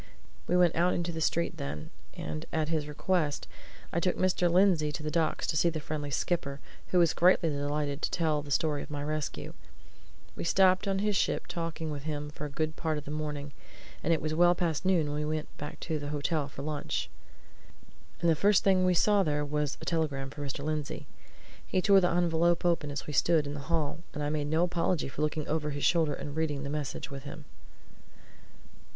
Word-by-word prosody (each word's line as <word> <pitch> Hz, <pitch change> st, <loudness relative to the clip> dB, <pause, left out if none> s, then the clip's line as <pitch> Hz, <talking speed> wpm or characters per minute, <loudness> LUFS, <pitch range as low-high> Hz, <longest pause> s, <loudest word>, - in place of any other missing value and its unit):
We 180 Hz, -, +3 dB
went 175 Hz, -2 st, +4 dB
out 175 Hz, +2 st, +3 dB
into 175 Hz, 0 st, -1 dB
the 160 Hz, -1 st, -4 dB
street 170 Hz, +2 st, 0 dB
then, 140 Hz, -, -5 dB, 0.2 s
and 75 Hz, 0 st, -5 dB
at 155 Hz, -1 st, 0 dB
his 155 Hz, -2 st, -1 dB
request 150 Hz, 0 st, 0 dB, 0.5 s
I 170 Hz, -, +2 dB
took 180 Hz, +1 st, 0 dB
Mr. 180 Hz, -1 st, +2 dB
Lindsey 175 Hz, -5 st, +4 dB
to 150 Hz, -, -5 dB
the 155 Hz, -, -2 dB
docks, 165 Hz, 0 st, +1 dB
to -, -, -1 dB
see 170 Hz, +3 st, +4 dB
the 160 Hz, -1 st, -3 dB
friendly 150 Hz, -1 st, -4 dB
skipper, 140 Hz, -2 st, -1 dB, 0.3 s
who 185 Hz, -, +1 dB
was 170 Hz, -2 st, +5 dB
greatly 175 Hz, -1 st, +4 dB
delighted 145 Hz, 0 st, -2 dB
to -, -, 0 dB
tell 155 Hz, -3 st, +1 dB
the 145 Hz, -, -10 dB
story 150 Hz, 0 st, +1 dB
of -, -, -8 dB
my 145 Hz, -1 st, -4 dB
rescue. 155 Hz, 0 st, -3 dB, 0.8 s
We -, -, -4 dB
stopped 185 Hz, +3 st, +4 dB
on 195 Hz, -1 st, +1 dB
his 210 Hz, -1 st, +1 dB
ship -, -, +1 dB
talking 165 Hz, -2 st, -4 dB
with 145 Hz, -1 st, -4 dB
him 150 Hz, -1 st, -3 dB
for 150 Hz, -, -6 dB
a -, -, -4 dB
good 155 Hz, +2 st, -2 dB
part 160 Hz, -2 st, -1 dB
of 150 Hz, -, -6 dB
the 145 Hz, -, -6 dB
morning, 150 Hz, -2 st, -4 dB, 0.5 s
and 165 Hz, -, 0 dB
it 160 Hz, -3 st, +1 dB
was 155 Hz, 0 st, -1 dB
well 175 Hz, +2 st, +5 dB
past 170 Hz, -2 st, -1 dB
noon 170 Hz, -6 st, +2 dB
when 145 Hz, -, -2 dB
we 155 Hz, +1 st, -1 dB
went 155 Hz, -, -6 dB
back 150 Hz, -, -6 dB
to 160 Hz, -2 st, -2 dB
the 145 Hz, 0 st, -5 dB
hotel 150 Hz, 0 st, -1 dB
for 140 Hz, -1 st, -8 dB
lunch. 150 Hz, -1 st, -2 dB, 1.1 s
And 170 Hz, -, +2 dB
the 165 Hz, -, +5 dB
first 200 Hz, +5 st, +4 dB
thing 190 Hz, -2 st, +4 dB
we 180 Hz, -1 st, +3 dB
saw 205 Hz, +3 st, +4 dB
there 150 Hz, -4 st, 0 dB
was 150 Hz, -1 st, -1 dB
a -, -, -7 dB
telegram 145 Hz, -5 st, -1 dB
for 145 Hz, -, -8 dB
Mr. 140 Hz, 0 st, -4 dB
Lindsey. 155 Hz, -2 st, -3 dB, 0.6 s
He 185 Hz, -, 0 dB
tore 195 Hz, 0 st, +6 dB
the 180 Hz, -, +3 dB
envelope 170 Hz, 0 st, +2 dB
open 170 Hz, -4 st, +2 dB
as 145 Hz, -1 st, -4 dB
we 150 Hz, -, -5 dB
stood 160 Hz, 0 st, +3 dB
in 145 Hz, -, -4 dB
the 145 Hz, +1 st, -7 dB
hall, 160 Hz, -2 st, 0 dB, 0.2 s
and 150 Hz, -, -2 dB
I 145 Hz, -, 0 dB
made 150 Hz, -1 st, -1 dB
no 160 Hz, +3 st, +2 dB
apology 175 Hz, -3 st, 0 dB
for 140 Hz, -, -6 dB
looking 155 Hz, 0 st, -1 dB
over 150 Hz, -1 st, -1 dB
his 145 Hz, -1 st, -2 dB
shoulder 160 Hz, -3 st, +3 dB
and 145 Hz, 0 st, -6 dB
reading 150 Hz, -3 st, -1 dB
the 140 Hz, -, -4 dB
message 145 Hz, -1 st, -4 dB
with 135 Hz, -1 st, -6 dB
him. 145 Hz, +1 st, -9 dB
155 Hz, 215 wpm, -30 LUFS, 145-170 Hz, 1.1 s, tore